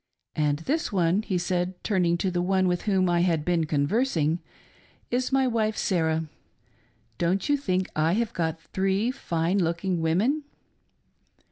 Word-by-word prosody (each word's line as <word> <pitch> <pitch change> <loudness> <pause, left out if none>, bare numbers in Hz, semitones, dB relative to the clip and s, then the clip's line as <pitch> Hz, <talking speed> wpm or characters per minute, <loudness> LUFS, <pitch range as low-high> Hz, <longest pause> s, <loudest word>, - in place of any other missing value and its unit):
And 150 -1 +1
this 315 +3 -1
one," 180 0 +2
he 195 -4 -2
said, 180 +1 -1
turning 180 -5 +1
to 185 +1 -1
the 175 0 0
one 190 +1 +2
with 180 -1 0
whom 190 -2 +3
I 175 -1 +2
had 165 -4 +1
been 170 -2 +1
conversing, 160 - +1 0.7
"is 250 +2 0
my 270 0 +3
wife 220 -3 0
Sarah. 160 -3 +1 1.0
Don't 180 +3 +1
you 290 - +3
think 185 -9 -1
I 155 +2 +2
have 230 +2 0
got 165 -2 -2
three 195 +5 0
fine 175 -7 -1
looking 170 +1 0
women 210 - +1
180 Hz, 150 wpm, -26 LUFS, 165-210 Hz, 1.0 s, whom